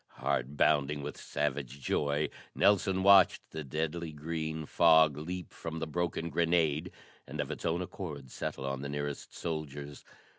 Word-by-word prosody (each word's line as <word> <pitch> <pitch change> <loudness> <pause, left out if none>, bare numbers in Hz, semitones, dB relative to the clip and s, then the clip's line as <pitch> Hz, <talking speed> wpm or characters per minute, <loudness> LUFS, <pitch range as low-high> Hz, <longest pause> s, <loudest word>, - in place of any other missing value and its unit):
Heart 65 +4 -1
bounding 75 -1 +3
with 75 - -5
savage 70 -2 -3
joy, 70 +2 0 0.3
Nelson 95 -2 +3
watched 100 -1 +7
the 80 -1 -5
deadly 80 +4 -3
green 80 +1 -4
fog 80 -2 +5
leap 90 +4 -6
from 80 -1 -6
the 80 - -2
broken 85 +1 -2
grenade 85 -1 +2 0.4
and - - -7
of - - -1
its - - -3
own 85 +2 0
accord 75 -8 -7
settle 65 - -4
on 70 0 -2
the 70 - -4
nearest 75 0 -4
soldiers. 75 -3 -5
80 Hz, 150 wpm, -31 LUFS, 70-85 Hz, 0.4 s, watched